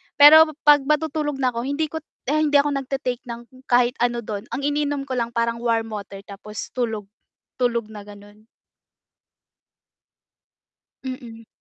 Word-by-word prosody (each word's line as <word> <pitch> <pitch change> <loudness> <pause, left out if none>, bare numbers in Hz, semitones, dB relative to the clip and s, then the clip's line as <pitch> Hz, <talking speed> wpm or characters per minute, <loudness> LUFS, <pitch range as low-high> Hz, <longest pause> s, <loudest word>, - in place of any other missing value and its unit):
pero 315 +2 +9 0.2
'pag 290 -2 +6
matutulog 300 -1 0
na 255 - +2
ako 235 0 -4
hindi 300 +2 -1
kot 320 -1 -6 0.2
hindi 300 0 +1
ako 285 +1 +5
nagta-take 265 -2 -4
ng 240 +2 -10
kahit 245 0 +3
ano 240 0 0
dun. 210 +1 -6
Ang 275 - -3
iniinom 290 -1 -1
ko 260 -2 -4
lang 235 0 -3
parang 230 0 0
warm 225 -2 -1
water 200 -1 -7
tapos 205 +1 -8
tulog, 225 -4 -2 0.6
tulog 235 -3 0
na 210 -1 -10
ganon. 205 +1 -15 2.6
Mm. 235 -3 -8
245 Hz, 140 wpm, -22 LUFS, 225-285 Hz, 2.6 s, pero